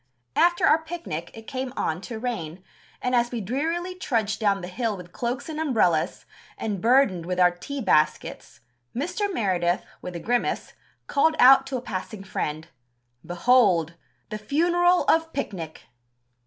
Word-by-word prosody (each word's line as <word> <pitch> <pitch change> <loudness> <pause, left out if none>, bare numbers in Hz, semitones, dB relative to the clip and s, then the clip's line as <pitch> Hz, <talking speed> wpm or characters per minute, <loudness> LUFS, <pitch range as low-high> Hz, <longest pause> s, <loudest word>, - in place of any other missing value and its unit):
"After 345 0 +4
our 310 +2 +5
picnic... 320 - -5
it 225 0 -11
came 260 0 -4
on 160 +3 -1
to 225 +3 -6
rain, 190 -8 -4 0.4
and 250 - 0
as 240 -1 +3
we 240 - -4
drearily 325 - -2
trudged 225 - -1
down 200 -3 +1
the 180 - -6
hill 215 +2 -2
with 180 -1 -11
cloaks 250 +6 -3
and 315 -1 -5
umbrellas, 215 - +1 0.3
and 205 -4 -3
burdened 225 -9 +3
with 180 0 -2
our 180 -1 +6
tea 270 +11 -6
baskets, 155 - 0 0.3
Mr. 360 - -2
Meredith, 185 - 0 0.2
with 180 -1 -7
a - - -3
grimace, 240 +8 -1 0.3
called 315 +3 +2
out 270 +1 +7
to 270 -1 -2
a - - -5
passing 205 -1 -5
friend: 160 -4 -4 0.5
'Behold! 175 -4 +3 0.4
the 215 - -4
funeral 350 - +2
of 325 0 +2
picnic!'" 180 - -5
230 Hz, 155 wpm, -25 LUFS, 180-280 Hz, 0.5 s, out